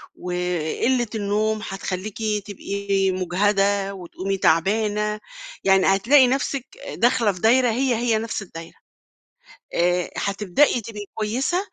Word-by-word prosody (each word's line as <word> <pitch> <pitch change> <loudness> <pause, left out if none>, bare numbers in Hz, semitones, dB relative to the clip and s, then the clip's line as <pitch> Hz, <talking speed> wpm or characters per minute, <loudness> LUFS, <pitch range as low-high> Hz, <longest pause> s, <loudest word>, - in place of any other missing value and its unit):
وقلّة 180 +7 -1
النوم 215 +1 0
هتخلّيكِ 195 +1 -5 0.3
تبقي 200 -1 -1
مُجهَدة 195 +2 +1
وتقومي 190 +1 -4
تعبانة، 210 +5 +1 0.4
يعني 195 -1 +4
هتلاقي 250 +8 +5
نَفْسِك 270 0 -1
أ 280 - -8
داخلة 235 -3 +3
في 180 - -10
دايرة 245 +2 +4
هي، 250 +2 +1
هي، 230 -1 +1
نفْس 220 -1 -3
الدايرة. 165 -3 -10 1.0
آآ، 175 0 +1
هتبدئي 210 +6 +1
تبقي 210 -1 -8
كويسة 245 +11 -1
205 Hz, 115 wpm, -23 LUFS, 190-230 Hz, 1.0 s, هتلاقي